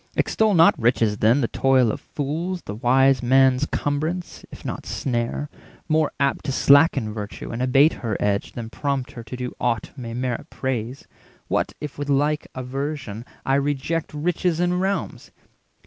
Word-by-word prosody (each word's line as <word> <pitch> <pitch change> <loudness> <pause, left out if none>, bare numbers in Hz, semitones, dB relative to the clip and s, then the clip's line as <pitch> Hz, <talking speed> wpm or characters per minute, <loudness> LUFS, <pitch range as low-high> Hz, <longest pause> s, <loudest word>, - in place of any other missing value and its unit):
Extol 215 -2 +2
not 165 0 +7
riches, 115 -3 +2
then, 115 +6 +4
the 120 - +1
toil 130 -3 +3
of - - -6
fools, 165 +6 -3
The 105 - -6
wise 130 +3 +3
man's 130 +2 +4
cumbrance, 155 +5 -2
if - - -12
not - - -5
snare; 120 +3 -2 0.4
more 155 -1 +2
apt 140 +1 0
To 135 - -1
slacken 140 -5 +4
virtue 105 -1 -6
and 115 +1 -4
abate 135 +5 +4
her 110 -4 -2
edge 100 -1 -1
Than 115 -2 -6
prompt 140 -1 -2
her 120 - -8
to 115 +3 -8
do 125 0 -4
aught 115 -3 -1
may 115 -4 -6
merit 125 +4 -3
praise. 130 -1 -4 0.4
What - - 0
if 150 -1 -7
with 145 0 -3
like 145 +2 +1
aversion 130 -3 -4 0.2
I 135 - +1
reject 145 +3 -1
Riches 170 +2 -1
and 180 +1 +1
realms! 195 +1 -2
135 Hz, 165 wpm, -23 LUFS, 120-150 Hz, 0.4 s, not